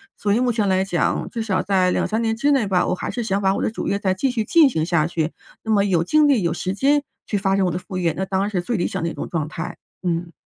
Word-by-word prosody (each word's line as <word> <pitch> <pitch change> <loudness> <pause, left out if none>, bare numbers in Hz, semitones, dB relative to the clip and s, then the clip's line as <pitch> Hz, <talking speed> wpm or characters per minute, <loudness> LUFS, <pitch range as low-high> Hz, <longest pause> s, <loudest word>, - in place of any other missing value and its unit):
所 205 -1 0
以 225 - +2
目 250 -1 +2
前 210 -3 +1
来 190 0 +2
讲， 175 -3 -1
至 230 - -4
少 195 -4 0
在 185 -2 +2
2，3 220 +4 0
年 225 -1 0
之 285 +5 +2
内 265 -7 +2
吧， 185 -2 +2
我 180 - 0
还 - - -5
是 245 - -3
想 200 -2 -1
把 190 -1 +2
我 - - -2
的 - - +1
主 - - -4
业 200 - +1
再 190 -2 +1
继 235 +9 0
续 225 -3 -1
进 315 +3 +5
行 160 -10 -1
下 165 -2 +1
去， 165 -2 -2 0.3
那 220 - -2
么 205 -2 +4
有 180 -5 +2
精 305 - +4
力 260 -7 +3
有 170 - +1
时 185 - -3
间 280 +7 +2 0.2
去 205 - -1
发 195 0 +1
展 195 - +2
我 180 - 0
的 170 - -2
副 185 0 -7
业， 170 -3 +1
那 190 - -1
当 190 0 -1
然 200 - 0
是 190 -4 -1
最 230 +5 -2
理 175 - 0
想 - - -4
的 170 - 0
一 - - -6
种 - - -5
状 155 -3 -2
态， 165 +2 -6 0.3
嗯。 170 -1 -2
195 Hz, 325 characters per minute, -22 LUFS, 180-225 Hz, 0.3 s, 进